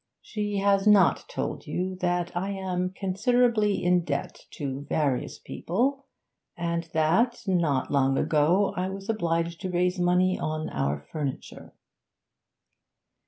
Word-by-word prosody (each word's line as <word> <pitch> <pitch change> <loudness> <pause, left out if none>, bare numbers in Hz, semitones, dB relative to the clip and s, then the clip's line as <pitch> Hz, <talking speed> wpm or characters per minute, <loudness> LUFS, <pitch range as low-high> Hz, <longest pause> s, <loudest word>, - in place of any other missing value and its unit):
'She 205 -2 -3
has 195 0 +2
not 205 -2 +5
told - - -4
you 185 +1 -2
that 175 -2 -1
I 190 +3 -1
am 185 -2 -2
considerably 210 +3 +1
in 180 0 +3
debt 140 -3 -4
to 135 -1 -4
various 140 -5 0
people, 270 +9 -2 0.5
and 170 -1 -2
that, 185 +11 +2
not 170 -8 +1
long 135 -1 +2
ago, 165 +6 +2
I 185 +1 -1
was 195 +2 -7
obliged 170 -5 -1
to 190 - -3
raise 180 +1 +1
money 180 +1 +2
on 155 0 -3
our 70 +1 -1
furniture.' 145 -4 -6
180 Hz, 125 wpm, -27 LUFS, 160-200 Hz, 0.5 s, not